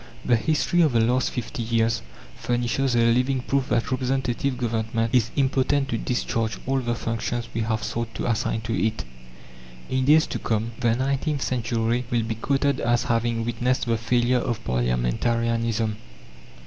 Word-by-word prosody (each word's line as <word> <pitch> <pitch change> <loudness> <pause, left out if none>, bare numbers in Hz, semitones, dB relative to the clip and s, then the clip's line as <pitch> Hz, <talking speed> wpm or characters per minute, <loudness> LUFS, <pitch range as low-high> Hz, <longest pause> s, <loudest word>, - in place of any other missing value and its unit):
The 120 - +4
history 160 +7 +1
of 155 -6 +3
the 115 - +3
last 125 +3 +2
fifty 120 -1 -5
years 115 0 +1 0.3
furnishes 120 +2 0
a 115 0 +4
living 130 +2 +1
proof 135 +1 -1
that 120 +3 0
Representative 130 0 -1
Government 115 -1 -1
is 120 -3 +3
impotent 135 0 +1
to 115 - 0
discharge 115 -2 -1
all 135 0 +1
the 120 -2 -1
functions 115 +1 -3
we 115 - -1
have 110 -1 -1
sought 115 -1 -3
to - - -3
assign 115 -1 0
to 110 +1 -3
it. 110 - -1 0.9
In 130 0 +1
days 155 +3 +6
to - - -4
come 110 +1 -1
the 120 -3 +2
nineteenth 140 +3 -1
century 120 0 0
will 120 -2 +1
be 115 +1 -2
quoted 135 +4 0
as 120 0 +1
having 115 -3 0
witnessed 120 +2 0
the 115 -1 +1
failure 120 +2 +2
of 120 -3 -3
parliamentarianism. 110 - 0
120 Hz, 160 wpm, -24 LUFS, 115-130 Hz, 0.9 s, days